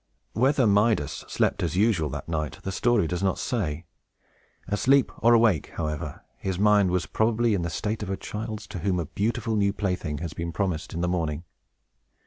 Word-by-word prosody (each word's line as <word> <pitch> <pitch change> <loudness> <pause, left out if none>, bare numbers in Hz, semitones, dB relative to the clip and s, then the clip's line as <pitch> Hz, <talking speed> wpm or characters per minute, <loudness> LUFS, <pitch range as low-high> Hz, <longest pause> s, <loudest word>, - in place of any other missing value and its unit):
Whether 130 +2 +3
Midas 105 - +2
slept - - 0
as 85 +1 -1
usual 100 -7 +2
that 70 +1 -6
night, 75 -5 -2
the 95 - -3
story 120 0 +2
does 90 +3 -2
not 95 -1 +1
say. 85 - -2 0.8
Asleep 125 +7 +3
or 120 +1 +5
awake, 110 -9 +2
however, 75 -1 -4
his 95 -2 -3
mind 105 -1 +4
was 90 -3 0
probably 115 +6 +1
in 95 - 0
the 85 - -2
state 105 +7 -3
of 105 - -4
a 95 - -1
child's, 110 0 -5
to 90 - -5
whom 90 +1 0
a 85 - -2
beautiful 110 - -1
new 100 -1 +2
plaything 90 -8 -2
has 80 0 -5
been 85 0 -4
promised 90 -4 -2
in 85 - -2
the 90 - +1
morning. 80 -3 -1
95 Hz, 185 wpm, -26 LUFS, 85-110 Hz, 0.8 s, or